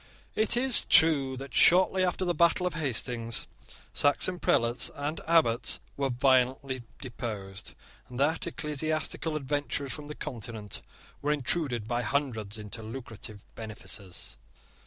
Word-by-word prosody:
It 220 +2 +1
is 255 -1 +7
true 140 -5 +5
that, 135 -2 -9
shortly 185 +4 +5
after 185 +1 0
the 175 - +1
battle 170 +1 +3
of 180 - -1
Hastings, 120 -6 -2 0.5
Saxon 175 +5 +1
prelates 115 -4 +2
and 145 +2 -4
abbots 155 -8 +3 0.2
were 140 -1 -1
violently 130 +1 +1 0.2
deposed, 110 -6 -7 0.3
and 125 0 -8
that 160 +5 +1
ecclesiastical 155 0 -1
adventurers 145 -1 -2
from 150 -1 -7
the 150 - -7
Continent 110 -3 -6 0.4
were 145 - 0
intruded 135 -5 0
by 120 +1 -1
hundreds 115 -7 -2
into 105 +1 -6
lucrative 110 -3 -7
benefices. 110 -4 -7
135 Hz, 125 wpm, -28 LUFS, 115-155 Hz, 0.5 s, is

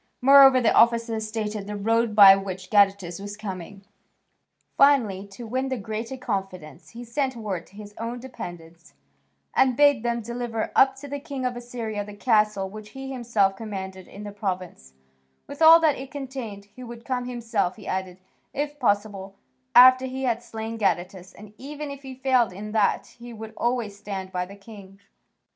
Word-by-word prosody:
Moreover, 270 0 +7
the 235 -3 +2
officer 230 -1 +3
stated 215 -2 -4
the 210 - -5
road 225 +2 0
by 195 -2 +10
which 190 -1 -6
Gadatas 195 -4 +2
was 205 +1 -7
coming. 195 -2 -8 0.9
Finally, 225 -9 +3
to 200 +4 -10
win 260 +4 -2
the 260 - -2
greater 220 +4 -5
confidence, 190 - -5
he 240 - -7
sent 260 +2 -2
word 205 -7 -5
to 200 - -21
his 205 0 -11
own 235 +2 -4
dependents 175 -9 -10 0.6
and 255 -2 +3
bade 285 -4 +5
them 235 0 -1
deliver 235 0 -4
up 265 0 +5
to 275 +2 -10
the 285 0 -5
king 275 -3 -6
of 250 -1 -1
Assyria 235 -4 -5
the 205 0 -11
castle 210 -3 +1
which 210 +2 -10
he 270 0 -6
himself 225 -6 +1
commanded 190 -3 -7
in 200 - -11
the 205 - -7
province, 185 - -5 0.5
with 285 +2 -10
all 325 +1 +9
that 310 -5 +2
it 265 0 -8
contained: 260 -8 -7
he 255 - -10
would 235 -1 -10
come 250 -2 -2
himself, 230 -7 -2
he 215 - -13
added, 185 -1 -4 0.4
if 290 +1 -3
possible, 205 -4 -1 0.4
after 255 +1 +8
he 260 +1 -5
had 240 -2 0
slain 225 -1 -6
Gadatas, 185 -1 -1
and, 210 0 -13
even 290 +2 -7
if 280 0 -9
he 265 -1 -9
failed 255 -5 +2
in 205 +3 -8
that, 215 -2 +1
he 240 0 -10
would 220 0 -9
always 235 -4 -1
stand 195 -2 -6
by 180 -1 -3
the 200 - -12
king. 200 -1 -14
220 Hz, 175 wpm, -25 LUFS, 200-255 Hz, 0.9 s, by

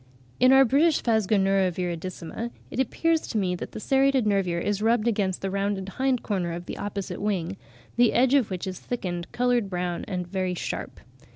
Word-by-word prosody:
In 255 - +6
our 270 0 +7
British 295 +6 +3
Phasgonura 195 -4 +2
viridissima 180 +4 -4 0.2
it - - -4
appeared 325 +6 +2
to 225 - -4
me 185 -3 +1
that - - -7
the - - -5
serrated 270 0 +2
nervure 195 -4 +1
is 205 +3 -1
rubbed 230 +1 +2
against 200 -5 0
the 195 - -1
rounded 195 -1 -1
hind 260 +3 0
corner 180 -5 -1
of 175 +1 -6
the - - -6
opposite 200 -1 -4
wing, 195 -3 -1 0.4
the 240 -1 +5
edge 255 +2 +3
of 270 -6 +3
which 185 -2 -4
is 185 -1 -5
thickened, 175 -8 -4
coloured 245 -4 +1
brown, 180 -1 -2
and 180 -2 -3
very 185 0 -2
sharp. - - -5
200 Hz, 185 wpm, -26 LUFS, 185-240 Hz, 0.4 s, our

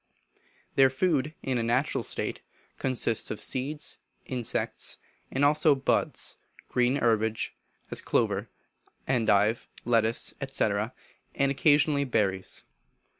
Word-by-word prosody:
Their 135 -1 +6
food, 150 +1 0
in 130 -2 0
a - - +1
natural 120 +5 +1
state, - - -1 0.4
consists 125 -4 +1
of 105 - -4
seeds, 145 +4 -1 0.3
insects, 125 -3 -2 0.3
and 135 +2 +1
also 150 0 +5
buds, 135 - 0 0.3
green 125 +1 +2
herbage, 110 -4 +1 0.4
as - - +1
clover, - - 0 0.6
endive, 110 -3 +2 0.2
lettuce, 115 -1 +2 0.2
&c., - - 0 0.7
and 140 0 +2
occasionally 145 0 +3
berries. 100 -7 -1
130 Hz, 105 wpm, -28 LUFS, 115-140 Hz, 0.7 s, Their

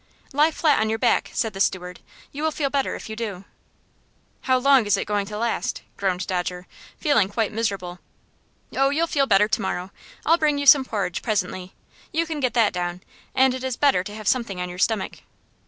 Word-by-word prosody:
"Lie 300 +3 +4
flat 310 -2 +2
on 220 - +1
your 220 - 0
back," - - +2
said 225 -3 -1
the 195 - -7
steward. 180 -2 -1 0.3
"You 285 - -6
will 315 - +2
feel 290 -3 -2
better 275 -1 0
if - - -8
you 220 - -6
do." 205 -5 -5 1.0
"How 260 -1 +4
long 265 -3 +4
is 200 -1 +3
it - - -2
going 205 -1 -1
to 210 0 -6
last?" 230 +1 -2
groaned 185 -2 -1
Dodger, 180 0 -3 0.3
feeling 280 - +3
quite 215 +1 -1
miserable. 195 -5 -3 0.8
"Oh, 270 +1 +3
you'll 315 +4 +1
feel 280 -4 +1
better 205 -1 +4
to 220 0 0
morrow. 185 -1 -3 0.3
I'll 330 +2 +4
bring 300 -2 +2
you 285 - -2
some 275 -1 +8
porridge 200 -7 -2
presently. 185 -4 -2 0.4
You 330 +1 0
can 315 -2 -4
get 255 -3 -1
that 230 -3 +3
down, 175 0 -3 0.3
and 265 0 +4
it 260 0 -5
is 260 -2 -2
better 275 -11 +3
to 205 - -7
have 215 -2 -7
something 225 -7 0
on 180 0 -3
your 180 +1 -8
stomach." 215 0 0
220 Hz, 205 wpm, -23 LUFS, 190-275 Hz, 1.0 s, some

